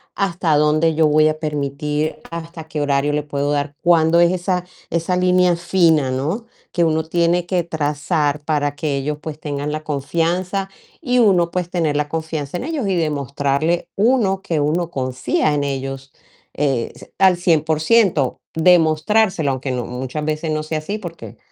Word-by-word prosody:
hasta 175 -5 0
dónde 155 +2 +2
yo 155 0 +4
voy 155 +1 +4
a 155 0 -1
permitir, 150 0 -2
hasta 165 0 -7
qué 155 -1 -3
horario 145 0 +1
le 150 - +1
puedo 145 0 -2
dar, 145 0 -2
cuándo 170 -1 +4
es 175 0 +5
esa 180 0 -1 0.2
esa 170 +2 0
línea 180 -1 +3
fina, 170 -5 +2
¿no? 155 - -2 0.2
Que 175 - +1
uno 160 -1 +1
tiene 170 +2 +1
que 175 -1 0
trazar, 150 -1 -1
para 145 -2 0
que 145 -1 -2
ellos, 145 +2 -2
pues, 155 -1 -7
tengan 145 -1 -3
la 155 0 -4
confianza, 170 +6 -1 0.3
y 250 -1 +1
uno 180 -7 +4
pues, 180 -1 -2
tener 165 -5 0
la 150 0 0
confianza 160 -1 -3
en - - -5
ellos, 295 -7 -2
y 190 - +1
demostrarle 145 +1 0
uno, 205 -3 +2
que 165 -5 -1
uno 160 +4 0
confía 130 +1 -1
en 145 -1 0
ellos, 135 -1 -4 0.4
eh, 135 -5 0
s - - -15
al 190 -2 +5
100%. 160 - +2
Demostrárselo, 165 +1 +3
aunque 130 0 -3
no 125 -2 -2
muchas 130 +4 -5
veces, 155 +1 -2
no 155 0 -1
sea 155 0 -3
así, 200 +7 -4
porque 170 - -9
155 Hz, 165 wpm, -20 LUFS, 145-175 Hz, 0.4 s, es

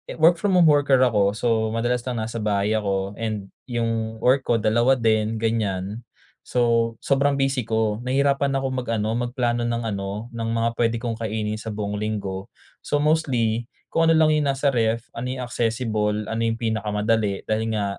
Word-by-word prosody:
work 165 +2 +4
from 195 +1 +1
home 175 -2 +6
worker 145 -3 +4
ako 105 -5 +2
so 115 - -2 0.3
madalas 120 +1 0
lang 120 -3 -2
nasa 115 +1 -4
bahay 105 -1 0
ako 100 -2 -1
and 110 -3 -4 0.2
yung 115 -2 -2
work 130 +1 +3
ko 120 - +3
2 120 +5 +3
din 110 -1 +1
ganyan, 110 -1 -2 0.4
so 115 -2 +1
sobrang 140 0 +1
busy 135 -2 +1
ko, 110 -1 0
nahirapan 140 +2 +1
akong 135 -1 -2
mag-ano, 110 -2 -1
magplano 120 0 -1
ng 120 0 -1
ano, 100 +1 -4
ng 115 -1 -3
mga 115 0 +1
puwede 115 0 +1
kong 115 -1 -3
kainin 110 -1 -2
sa 110 +1 -6
buong 105 -1 -3
linggo. 100 -2 -4 0.3
So, 145 - 0
mostly 125 -7 +1 0.2
kung 165 0 +2
ano 160 - +4
lang 155 -1 +4
yung 150 -2 +1
nasa 135 +1 -1
ref, 115 0 0
ano 125 +2 -4
yung 130 - -5
accessible, 110 -3 -1
ano 115 +1 -2
yung 115 0 0
pinakamadali, 105 -2 0
dahil 110 +1 0
nga 105 -2 0
115 Hz, 175 wpm, -23 LUFS, 110-125 Hz, 0.4 s, home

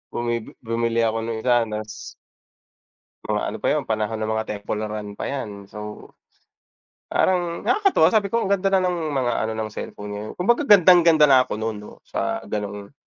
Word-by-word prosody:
Bumi 120 -1 -2
bumili 115 0 0
ako 115 0 0
nung 115 -1 -3
isa, 120 -1 +3
nas 105 0 -7 1.2
Mga - - +1
ano - - -5
pa - - 0
yun, - - +1
panahon 110 0 -1
ng 110 0 -2
mga 110 0 -1
Temple 105 0 -4
Run 105 -1 -4
pa - - -5
yan. 105 -8 -6
So, 105 0 -9 1.0
parang 175 -2 0
nakakatuwa 380 - +3
sabi 205 -2 +2
ko, 230 0 0
"Ang 195 - -2
ganda 195 0 +1
na 195 -1 +3
ng 170 -3 -1
mga 130 -4 0
ano 110 - -1
ng 110 -1 -3
cellphone 105 0 -7
ngayon," 105 +1 -6
kumbaga 235 +10 +2
gandang-ganda 175 -5 +7
na 130 -2 +6
ako 105 - -5
nun 110 -1 -3
'no, 105 - -12
sa - - -2
ganung, 105 +2 -5
115 Hz, 180 wpm, -23 LUFS, 105-170 Hz, 1.2 s, gandang-ganda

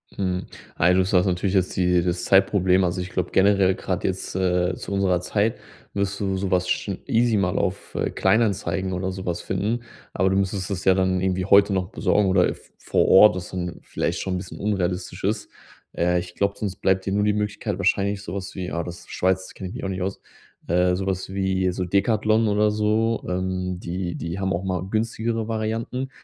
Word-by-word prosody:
Mhm. 95 -1 -2 0.3
Ey, 90 +2 +5
du 95 - +4
hast 95 - -1
jetzt 90 -2 +4
natürlich 95 0 +1
die 90 -1 +2
das 90 0 -1
Zeitproblem. 95 -1 +4
Also 90 +1 -1
ich 90 - -5
glaube 90 0 -2
generell 95 -1 +4
grad - - -3
jetzt, - - -3
äh, 90 -1 +1
zu 100 - -6
unserer 95 -2 +2
Zeit, 105 +5 0 0.4
wirst 100 0 -2
du 95 -1 0
so 95 0 -2
was 90 -1 +1
schon 100 0 -1
easy 115 0 +2
mal 95 -2 +1
auf, 95 0 -2
äh, - - 0
Kleinanzeigen 100 -4 +1
oder 95 +1 -2
so 95 0 -7
was 85 -1 -2
finden, 105 +5 -1 0.3
aber 95 +1 +2
du 95 - +1
müsstest 95 0 -1
es 95 -3 -4
ja 95 - +6
dann 95 -1 +1
irgendwie 95 0 0
heute 100 +1 +5
noch 95 -2 -1
besorgen 105 -2 +1
oder, 90 -1 +4
äh, - - -2
v - - -19
vor - - +1
Ort, 100 +1 +8
was 90 -1 -5
dann 90 -2 -5
vielleicht - - -2
schon 95 -1 -2
'n - - -1
bisschen 90 -1 -8
unrealistisch 95 -3 -2
ist. - - -1 0.4
Äh, 90 +1 +1
ich 90 0 -8
glaube, 100 0 +1
sonst 100 -3 -4
bleibt 95 0 +1
dir 95 - -1
nur 105 +1 +2
die 105 - +3
Möglichkeit 105 -1 -2
wahrscheinlich 100 +1 +1
so 85 - -6
was 95 -2 -5
wie 90 -1 -4
ah, 85 - -2
das 85 +1 -7
ist - - -15
Schweiz, 95 0 0
da - - -13
kenne 95 - -5
ich 105 - -9
mich 125 - -6
auch 95 - -2
nicht 95 -1 -3
aus, 95 +1 -4 0.5
äh, 90 +1 +2
so 95 +1 -3
was 95 0 -3
wie 95 -1 +1
so 90 +1 -3
Decathlon 110 +4 +2
oder 105 0 +2
so. 110 +2 +1
Ähm, 90 0 -2
die 90 0 -4
die 85 +3 -4
haben 95 0 0
auch 85 - -2
mal 90 -2 -2
günstigere 115 +1 -1
Varianten. 115 +4 -2
95 Hz, 220 wpm, -24 LUFS, 90-100 Hz, 0.5 s, Ort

